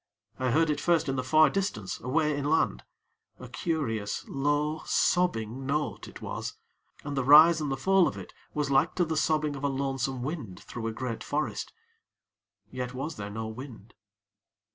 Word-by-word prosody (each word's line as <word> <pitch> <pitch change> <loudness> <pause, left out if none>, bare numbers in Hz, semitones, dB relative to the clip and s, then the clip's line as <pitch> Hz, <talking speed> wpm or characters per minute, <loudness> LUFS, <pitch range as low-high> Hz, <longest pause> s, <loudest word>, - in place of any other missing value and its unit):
I 130 -1 +1
heard 160 +5 +3
it 145 0 -2
first 170 -2 +2
in 135 - 0
the 130 - -1
far 155 +4 +5
distance, 185 - -2
away 150 +4 +1
inland 145 - +1 0.6
a 125 - -9
curious, 115 -8 -2
low, 145 +3 0
sobbing 130 -8 +1
note 150 +1 -2
it - - -11
was, - - -5 0.5
and 145 -1 -4
the 135 - 0
rise 155 +4 +8
and 145 -2 -2
the 135 - -1
fall 190 +4 +4
of - - -4
it - - -9 0.2
was 145 -2 -1
like 155 +6 +3
to 175 - +2
the 160 0 -2
sobbing 155 -2 +1
of 140 - -8
a - - +3
lonesome 135 -2 -2
wind 135 - -5
through 115 -2 -6
a - - -1
great 115 0 -4
forest. 150 +1 -2 1.0
Yet 125 0 -5
was 145 +4 -4
there 100 0 -5
no 110 +2 -5
wind. 115 -2 -9
140 Hz, 175 wpm, -28 LUFS, 125-155 Hz, 1.0 s, rise